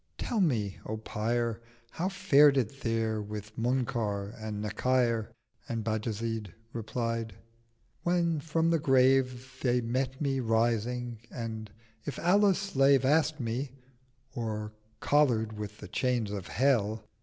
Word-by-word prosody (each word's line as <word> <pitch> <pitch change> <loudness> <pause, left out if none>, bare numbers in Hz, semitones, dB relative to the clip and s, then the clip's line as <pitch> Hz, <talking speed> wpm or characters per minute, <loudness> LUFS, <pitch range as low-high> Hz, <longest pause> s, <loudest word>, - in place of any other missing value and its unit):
Tell 225 -4 -1
me 110 - 0
O 110 - -3
Pyr, 115 +1 -1 0.3
How 180 +3 -1
fared 145 -7 +5
it 130 +2 -1
there 115 -2 0
with 105 0 -7
Munkar 115 -4 -1
and 110 -3 -5
Nakyr?' 115 +1 +1 0.4
And 115 -2 -2
Bajazyd 110 -2 -3 0.2
replied, 115 -2 -3 0.7
'When 170 -2 +1
from 165 +2 +1
the 165 - +3
Grave 130 -2 +2
They 125 -1 +2
met 130 +2 -2
me 135 -3 0
rising, 120 0 0
and 110 -2 -5 0.3
"If 145 - -5
Allah's 195 +2 +4
slave" 140 -9 +3
Ask'd 155 +2 +3
me, 125 +2 -3 0.6
"or 105 -2 -4 0.3
collar'd 120 -7 +3
with 105 -1 -6
the - - -9
Chain 120 -5 0
of 95 - -6
Hell?" 115 -5 +1
120 Hz, 125 wpm, -30 LUFS, 110-135 Hz, 0.7 s, fared